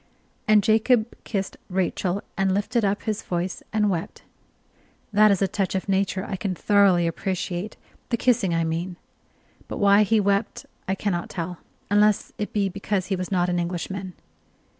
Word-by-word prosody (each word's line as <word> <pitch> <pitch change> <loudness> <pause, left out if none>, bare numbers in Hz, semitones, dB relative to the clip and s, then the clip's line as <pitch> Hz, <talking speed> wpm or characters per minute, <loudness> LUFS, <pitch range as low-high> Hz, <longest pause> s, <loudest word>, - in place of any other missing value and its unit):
And 215 -1 +5
Jacob 220 +2 +3
kissed 195 -3 -3
Rachel, 185 +1 -1
and 195 -1 +1
lifted 210 +3 0
up 200 +1 0
his 215 -1 -2
voice 180 +1 -3
and 215 -1 +2
wept. 175 -4 -3 0.9
That 215 +1 +6
is 200 -1 +2
a - - +3
touch 195 0 -2
of 190 - -2
nature 195 0 0
I 195 - -4
can 185 -1 -2
thoroughly 195 -3 +4
appreciate 180 +3 -3 0.3
the 235 - +1
kissing, 235 -6 +2
I 165 0 +1
mean; 170 +3 -2 0.7
but - - -5
why 200 0 +5
he 215 +1 +3
wept 200 +1 0 0.2
I 190 - 0
cannot 190 -4 -2
tell, 175 0 -5 0.3
unless 210 0 +3
it 210 - -3
be 205 -2 +1
because 195 0 -2
he - - +2
was 185 0 -4
not 180 -2 +2
an 175 -1 0
Englishman. 180 +2 -4
195 Hz, 165 wpm, -24 LUFS, 180-210 Hz, 0.9 s, That